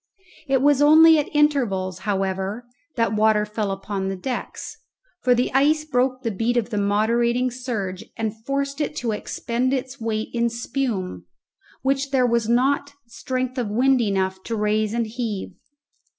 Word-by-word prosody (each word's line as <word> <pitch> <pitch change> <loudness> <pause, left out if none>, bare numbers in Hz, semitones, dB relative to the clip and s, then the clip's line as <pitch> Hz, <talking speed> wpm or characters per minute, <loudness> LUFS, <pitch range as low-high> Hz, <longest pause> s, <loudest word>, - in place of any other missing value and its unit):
It 270 -1 +2
was 290 -1 +4
only 315 +2 +7
at 295 - -2
intervals, 235 - +1
however, 195 +3 -2 0.3
that 230 -4 +1
water 215 0 +3
fell 210 -1 -3
upon 195 0 -3
the 195 - -2
decks, 245 +7 -5 0.5
for 250 -1 +4
the 245 +1 0
ice 300 +3 +3
broke 255 -2 0
the 230 - -1
beat 230 +5 0
of 235 0 -1
the 210 - 0
moderating 235 +5 +1
surge 220 -7 -4
and 220 -2 -2
forced 275 +2 -2
it 300 - -2
to 240 -6 -2
expend 240 +4 -1
its 260 0 -5
weight 220 -1 -2
in 235 0 +1
spume, 225 - -3 0.6
which 275 +1 0
there 265 -2 +3
was 235 -2 +1
not 275 +4 +2
strength 255 +2 -3
of 235 -4 -2
wind 255 +4 +3
enough 190 -3 -1
to 230 - -2
raise 215 +1 0
and 235 -1 0
heave. 220 -4 -4
235 Hz, 160 wpm, -23 LUFS, 210-265 Hz, 0.6 s, only